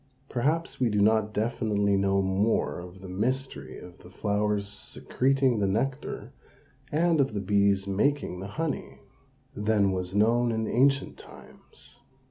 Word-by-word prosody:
Perhaps 150 +7 -1
we 125 -2 +2
do 105 -1 0
not 110 +1 +3
definitely 105 -2 0
know 100 0 +2
more 95 +3 0
of 90 +2 -11
the 95 - -9
mystery 105 - -3
of 90 0 -12
the 90 - -14
flower's 105 +1 -1
secreting 130 +5 0
the 100 - +1
nectar, 125 +8 -2 0.6
and 165 0 +3
of 130 -5 -1
the - - 0
bee's 100 0 +2
making 105 0 0
the 95 - -6
honey, 160 -3 -3 0.5
than 105 -2 +2
was 90 0 -3
known 115 +3 +3
in 110 -1 -1
ancient 135 +2 +2
times. - - -13
105 Hz, 140 wpm, -27 LUFS, 100-125 Hz, 0.6 s, not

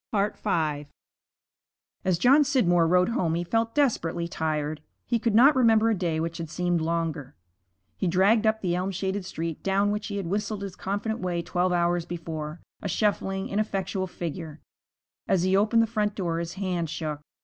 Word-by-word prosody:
V 165 -8 -1 1.2
As 185 -2 +2
John 270 - +5
Scidmore 175 - +3
rode 180 +3 +3
home 170 -8 0
he 170 - -1
felt 225 +5 -1
desperately 175 - +1
tired. 155 -3 -2 0.2
He 235 - 0
could 225 -1 0
not 275 +6 +7
remember 225 -3 +4
a - - +2
day 170 -4 -1
which 165 +1 -3
had 165 -2 -5
seemed 175 0 0
longer. 160 -4 -2 0.6
He 190 - -1
dragged 200 +6 +3
up 220 0 +1
the 180 -3 0
elm 185 +2 -1
shaded 190 +1 -2
street, 165 -2 -4
down 200 +1 +1
which 210 0 -3
he 200 - -4
had 195 - -3
whistled 205 +3 -2
his 195 -2 -6
confident 210 +4 -3
way 175 -2 -2
twelve 180 +2 0
hours 175 -1 +1
before, 160 -2 -5 0.2
a 200 - -3
shuffling, 195 0 0
ineffectual 195 -2 -2
figure. 165 -3 -6 0.7
As 185 -3 +2
he 185 +1 +2
opened 220 +3 +4
the - - +2
front 210 -2 -1
door 170 -4 -1
his 170 0 -4
hand 180 -4 -2
shook. 150 -1 -4
185 Hz, 175 wpm, -26 LUFS, 165-210 Hz, 1.2 s, not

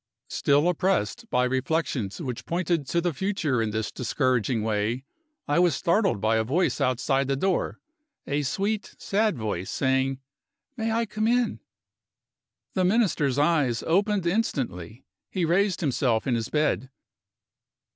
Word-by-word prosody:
Still 145 +3 +3
oppressed 180 - 0
by 125 - +2
reflections 130 - -1
which 130 -8 -5
pointed 170 -4 0
to 170 - +1
the 175 -1 0
future 155 - 0
in 110 - 0
this 110 +1 -2
discouraging 125 -2 0
way, 110 +3 -1 0.4
I 145 +3 +2
was 175 -5 +4
startled 190 - +1
by 110 +2 +2
a 110 - +2
voice 155 +6 0
outside 135 +1 +1
the 135 - +1
door 185 +6 0 0.5
a 145 +1 0
sweet, 200 +9 -2
sad 210 -3 0
voice 100 -5 -3
saying, 135 0 0 0.6
"May 225 -2 -1
I 230 +1 +1
come 215 +1 -1
in?" 245 0 +1 1.1
The 185 - +1
Minister's 180 - +2
eyes 145 -6 +2
opened 200 +2 +1
instantly: 125 - -2 0.2
he 185 -3 -1
raised 185 +3 +2
himself 125 -6 +1
in 130 - +1
his 115 -2 -1
bed. 150 -3 0
145 Hz, 140 wpm, -26 LUFS, 125-185 Hz, 1.1 s, was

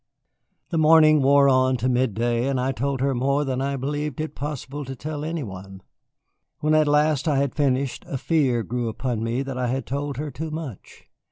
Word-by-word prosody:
The 165 - +1
morning 155 -1 +6
wore 140 +1 +5
on 130 -1 +3
to 120 +2 -1
midday, 120 -1 +1
and 135 -2 0
I 130 +1 0
told 135 +1 -2
her 135 0 +1
more 140 +4 +1
than 130 -1 -2
I 140 +1 -1
believed 145 +1 -3
it 155 0 -3
possible 145 0 -5
to 135 0 -7
tell 150 +2 -5
any 160 -1 -3
one. 95 -2 -9 0.7
When 155 +1 +1
at 155 -1 +4
last 150 0 +2
I 145 -3 +2
had 140 -2 0
finished 135 -3 0
a 135 - -3
fear 130 -6 +1
grew 120 +3 -2
upon 115 0 -3
me 120 +4 -1
that 135 -2 -5
I 125 - 0
had 130 +2 -2
told 140 +1 -3
her 150 +1 -4
too 155 +6 -5
much. 155 - -8
135 Hz, 200 wpm, -24 LUFS, 125-150 Hz, 0.7 s, morning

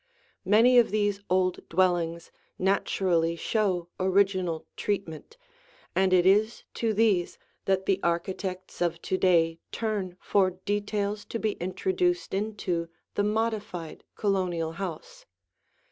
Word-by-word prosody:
Many 230 +6 +6
of 235 - +3
these 205 -1 0
old 185 -1 0
dwellings 170 -2 +1 0.3
naturally 185 -3 +1
show 185 -1 0
original 185 -3 +1
treatment, 195 - -4 0.6
and 190 0 +3
it 180 -1 +4
is 210 +4 +3
to 230 -1 0
these 205 -5 +2 0.3
that 190 0 +1
the 195 -1 +2
architects 185 +2 -3
of 170 -1 0
to - - -1
day 165 -3 +3
turn 205 -5 -3
for 195 -2 +2 0.2
details 205 0 -1
to - - -4
be 220 -1 0
introduced 355 - -1
into 190 -5 -2 0.2
the 205 - 0
modified 210 -6 -2
Colonial 180 -5 0
house. - - -7
190 Hz, 115 wpm, -27 LUFS, 175-210 Hz, 0.6 s, Many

